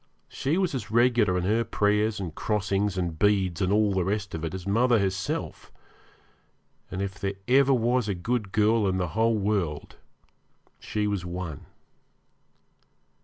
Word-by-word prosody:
She 145 Hz, +6 st, -1 dB
was 185 Hz, -4 st, 0 dB
as 120 Hz, -5 st, -4 dB
regular 115 Hz, -4 st, +3 dB
in 90 Hz, -, -1 dB
her 110 Hz, +5 st, +2 dB
prayers 105 Hz, 0 st, +1 dB
and 90 Hz, -5 st, -5 dB
crossings 100 Hz, -1 st, -1 dB
and 85 Hz, -4 st, -3 dB
beads 95 Hz, -5 st, +2 dB
and 95 Hz, 0 st, +1 dB
all 105 Hz, -1 st, +3 dB
the 95 Hz, -1 st, +1 dB
rest 100 Hz, 0 st, -2 dB
of 80 Hz, 0 st, -5 dB
it 80 Hz, +2 st, -3 dB
as 95 Hz, -1 st, -7 dB
mother 115 Hz, +4 st, +3 dB
herself, 95 Hz, -2 st, -3 dB, 1.2 s
and 95 Hz, -, -3 dB
if 100 Hz, 0 st, -5 dB
there 100 Hz, 0 st, -2 dB
ever 135 Hz, +2 st, +4 dB
was 120 Hz, -1 st, +2 dB
a 100 Hz, -, 0 dB
good 105 Hz, +2 st, -2 dB
girl 105 Hz, 0 st, +3 dB
in 95 Hz, -1 st, 0 dB
the 90 Hz, -3 st, -1 dB
whole 115 Hz, +4 st, +1 dB
world 95 Hz, -8 st, -2 dB, 0.8 s
she 105 Hz, -1 st, -2 dB
was 100 Hz, -3 st, -1 dB
one. 90 Hz, -4 st, -6 dB
105 Hz, 160 wpm, -26 LUFS, 95-110 Hz, 1.2 s, ever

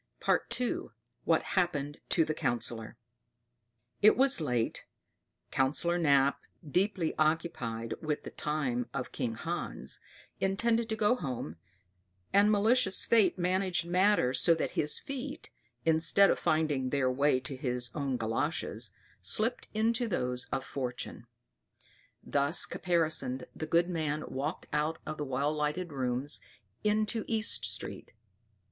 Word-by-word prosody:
II. 250 Hz, -1 st, +1 dB, 0.4 s
What 165 Hz, -1 st, +3 dB
Happened 150 Hz, -6 st, 0 dB
to 165 Hz, -, +3 dB
the 155 Hz, -, -1 dB
Councillor 115 Hz, -4 st, -2 dB, 1.0 s
It 215 Hz, +1 st, +6 dB
was 270 Hz, -7 st, +4 dB
late; 125 Hz, -6 st, -1 dB, 0.6 s
Councillor 160 Hz, +6 st, +1 dB
Knap, 140 Hz, -3 st, +3 dB, 0.3 s
deeply 180 Hz, +1 st, 0 dB
occupied 140 Hz, -8 st, 0 dB
with 155 Hz, -2 st, -2 dB
the -, -, -7 dB
times 135 Hz, -5 st, -2 dB
of 130 Hz, -2 st, -3 dB
King 115 Hz, -2 st, -3 dB
Hans, 170 Hz, +9 st, -5 dB, 0.4 s
intended 225 Hz, +4 st, +1 dB
to 220 Hz, -, 0 dB
go 215 Hz, +3 st, +3 dB
home, 125 Hz, -, -5 dB, 0.8 s
and 205 Hz, +1 st, +5 dB
malicious 210 Hz, -1 st, +3 dB
Fate 225 Hz, -4 st, +4 dB
managed 185 Hz, -1 st, 0 dB
matters 180 Hz, -6 st, +3 dB
so 170 Hz, -, +5 dB
that -, -, -2 dB
his 150 Hz, -, +2 dB
feet, 275 Hz, 0 st, -6 dB, 0.3 s
instead 165 Hz, +5 st, +5 dB
of -, -, -1 dB
finding 150 Hz, -5 st, +1 dB
their 130 Hz, -1 st, +1 dB
way 140 Hz, 0 st, +2 dB
to 130 Hz, +1 st, -5 dB
his 125 Hz, -2 st, -2 dB
own 140 Hz, -4 st, -1 dB
galoshes, 115 Hz, -1 st, -2 dB, 0.3 s
slipped 220 Hz, -, +1 dB
into 230 Hz, +2 st, +1 dB
those 125 Hz, -, -1 dB
of 130 Hz, -, -2 dB
Fortune. 125 Hz, -2 st, -5 dB, 1.0 s
Thus 140 Hz, +4 st, +1 dB
caparisoned 160 Hz, -7 st, 0 dB
the 155 Hz, -, -5 dB
good 170 Hz, +2 st, +3 dB
man 155 Hz, -4 st, -2 dB
walked 135 Hz, +2 st, -4 dB
out 150 Hz, +2 st, 0 dB
of 155 Hz, -, -5 dB
the 150 Hz, -, -3 dB
well 140 Hz, +3 st, 0 dB
lighted 155 Hz, +3 st, -2 dB
rooms 130 Hz, +2 st, -1 dB, 0.4 s
into 215 Hz, +1 st, +1 dB
East 220 Hz, -1 st, +2 dB
Street. -, -, -4 dB
155 Hz, 125 wpm, -31 LUFS, 130-195 Hz, 1.0 s, It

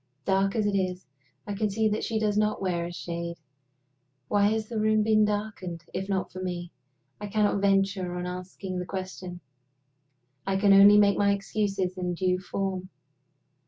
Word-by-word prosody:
Dark 195 Hz, 0 st, +2 dB
as 215 Hz, -2 st, +1 dB
it 205 Hz, -1 st, +1 dB
is, 185 Hz, -1 st, -1 dB, 0.4 s
I 205 Hz, -, -4 dB
can 210 Hz, +1 st, 0 dB
see 220 Hz, +2 st, +1 dB
that 210 Hz, -, -2 dB
she 225 Hz, -, -1 dB
does 210 Hz, -1 st, +1 dB
not 210 Hz, 0 st, +1 dB
wear 175 Hz, -3 st, -1 dB
a -, -, -7 dB
shade. 170 Hz, 0 st, -5 dB, 0.9 s
Why 205 Hz, -1 st, +4 dB
has 220 Hz, 0 st, 0 dB
the 225 Hz, -1 st, -3 dB
room 215 Hz, 0 st, +3 dB
been 215 Hz, 0 st, +4 dB
darkened 205 Hz, -5 st, -3 dB
if 190 Hz, +2 st, -4 dB
not 190 Hz, -1 st, -1 dB
for 185 Hz, -, -7 dB
me? 175 Hz, -1 st, -4 dB, 0.5 s
I 205 Hz, -, -5 dB
cannot 205 Hz, -1 st, +1 dB
venture 195 Hz, -2 st, +1 dB
on 180 Hz, 0 st, -3 dB
asking 185 Hz, +1 st, -5 dB
the 180 Hz, -, -4 dB
question 185 Hz, -2 st, -6 dB, 1.1 s
I 195 Hz, 0 st, +1 dB
can 200 Hz, 0 st, +5 dB
only 200 Hz, +1 st, +8 dB
make 205 Hz, -1 st, +4 dB
my 200 Hz, 0 st, +4 dB
excuses 195 Hz, -2 st, -2 dB
in 180 Hz, -1 st, -2 dB
due 185 Hz, +1 st, +1 dB
form. 185 Hz, 0 st, -3 dB
195 Hz, 175 wpm, -27 LUFS, 185-205 Hz, 1.1 s, only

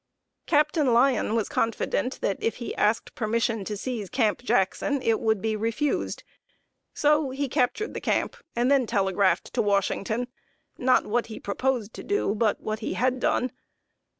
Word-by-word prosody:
Captain 300 Hz, -2 st, +3 dB
Lyon 245 Hz, -3 st, +3 dB
was 225 Hz, -3 st, 0 dB
confident 230 Hz, +3 st, -1 dB
that 195 Hz, -, -1 dB
if 230 Hz, -, 0 dB
he 240 Hz, -, -5 dB
asked 215 Hz, +2 st, +1 dB
permission 225 Hz, -1 st, 0 dB
to 210 Hz, +1 st, -4 dB
seize 220 Hz, -4 st, -4 dB
Camp 230 Hz, -4 st, +1 dB
Jackson, 250 Hz, +5 st, +1 dB
it 225 Hz, -1 st, +2 dB
would 220 Hz, -3 st, 0 dB
be 220 Hz, -1 st, 0 dB
refused. 230 Hz, -, -1 dB, 0.7 s
So 300 Hz, -1 st, +2 dB
he 275 Hz, +2 st, -2 dB
captured 270 Hz, -, 0 dB
the -, -, -5 dB
camp, -, -, 0 dB, 0.2 s
and 240 Hz, +3 st, +2 dB
then 270 Hz, -4 st, +3 dB
telegraphed 195 Hz, -3 st, +1 dB
to -, -, +2 dB
Washington 205 Hz, +3 st, 0 dB, 0.5 s
not 255 Hz, 0 st, +3 dB
what 235 Hz, +3 st, 0 dB
he 220 Hz, -, -8 dB
proposed 230 Hz, +1 st, -1 dB
to -, -, -8 dB
do, 405 Hz, -, 0 dB
but 215 Hz, -1 st, +1 dB
what 215 Hz, 0 st, -3 dB
he 220 Hz, -, -3 dB
had 255 Hz, +1 st, +1 dB
done. 250 Hz, 0 st, +1 dB
230 Hz, 160 wpm, -26 LUFS, 215-260 Hz, 0.7 s, Captain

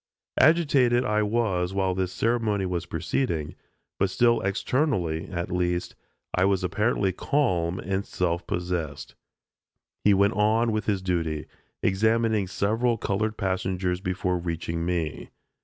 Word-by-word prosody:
Agitated 140 Hz, -7 st, +4 dB
I 105 Hz, 0 st, +2 dB
was 105 Hz, -4 st, 0 dB
while 95 Hz, -1 st, +1 dB
this 90 Hz, 0 st, -1 dB
ceremony 110 Hz, -2 st, 0 dB
was 90 Hz, -2 st, -3 dB
proceeding, 80 Hz, -, -2 dB, 0.5 s
but 95 Hz, -, +2 dB
still 120 Hz, +3 st, +3 dB
externally, 95 Hz, -, 0 dB
at 85 Hz, -1 st, -4 dB
least, 90 Hz, -1 st, -1 dB, 0.4 s
I 90 Hz, -, +2 dB
was 95 Hz, -1 st, +2 dB
apparently 105 Hz, +1 st, +1 dB
calm 90 Hz, -, 0 dB
and 95 Hz, +1 st, -2 dB
self 85 Hz, -2 st, -2 dB
possessed. 85 Hz, -5 st, -3 dB, 0.9 s
He 105 Hz, -1 st, +5 dB
went 100 Hz, +2 st, +3 dB
on 110 Hz, +2 st, +2 dB
with 110 Hz, 0 st, -2 dB
his 100 Hz, -3 st, 0 dB
duty 80 Hz, -4 st, -1 dB, 0.4 s
examining 110 Hz, +1 st, +2 dB
several 115 Hz, +5 st, 0 dB
colored 110 Hz, +1 st, -1 dB
passengers 95 Hz, -2 st, -1 dB
before 90 Hz, -1 st, -1 dB
reaching 85 Hz, -1 st, -3 dB
me. 85 Hz, -4 st, -2 dB
95 Hz, 125 wpm, -26 LUFS, 90-110 Hz, 0.9 s, He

